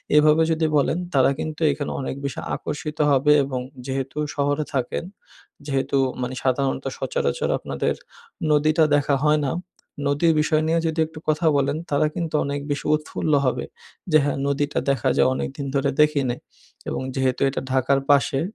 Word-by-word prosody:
এভাবে 150 +1 +5
যদি 160 0 +1
বলেন, 145 +3 +1 0.2
তারা 135 -1 +4
কিন্তু 155 +1 -5
এখানে 145 0 -3
অনেক 135 -1 -3
বেশি 140 - -3 0.2
আকর্ষিত 150 +1 -5
হবে 140 +2 +4
এবং 135 -2 -3 0.3
যেহেতু 135 +1 -4 0.2
শহরে 145 +1 0
থাকেন, 130 +2 -1 0.6
যেহেতু 140 -1 0 0.2
মানে 125 +1 -3
সাধারণত 135 +1 0
সচরাচর - - -1
আপনাদের - - -2 0.6
নদীটা 155 +2 +3
দেখা 145 0 +2
হয় 150 0 +4
না, 135 - 0 0.6
নদীর 150 +4 +3
বিষয় 155 0 +2
নিয়ে 165 +1 +2
যদি 160 0 -2
একটু 160 0 -11
কথা 155 +2 +2
বলেন, 140 +2 +1
তারা 145 +2 +3
কিন্তু 165 -3 -2
অনেক 140 0 -2
বেশি 140 - -3
উৎফুল্ল 155 0 -2
হবে। 130 - 0 0.5
যে, 155 - +7
"হ্যাঁ, 145 -1 -1
নদীটা 145 +1 0
দেখা 140 - +1
যায়। - - +5
অনেকদিন 140 +2 -4
ধরে 140 0 +2
দেখি 150 -1 +3
নাই।" 120 - -3 0.5
এবং - - -3
যেহেতু 130 -2 0
এটা 135 - -3
ঢাকার 135 +1 +2
পাশে, 135 -1 +3
145 Hz, 160 wpm, -23 LUFS, 135-155 Hz, 0.6 s, যে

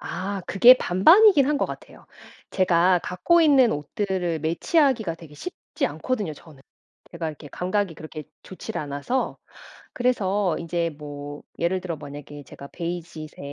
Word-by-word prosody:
아 195 +1 -4
그게 195 +8 +8
반반이긴 295 - +5
한 295 0 +1
것 - - 0
같아요. - - -11 0.4
제가 180 -1 +3
갖고 340 - +2
있는 275 -7 +5
옷들을 175 +2 -2
매치하기가 220 - +1
되게 165 -3 -14
쉽지 360 - -4
않거든요 210 -11 -3
저는. 150 -3 -17 0.5
제가 165 -2 -4
이렇게 150 -1 -10
감각이 185 +2 -2
그렇게 155 -1 -9 0.2
좋질 185 - -8
않아서. 145 - -3 0.5
그래서 205 -8 0
인제 170 0 -2
뭐 145 -1 -8 0.2
예를 185 +2 0
들어 180 -2 -4
만약에 145 0 -10
제가 140 +2 -11
베이지색 170 -3 -6
175 Hz, 315 characters per minute, -24 LUFS, 155-210 Hz, 0.5 s, 그게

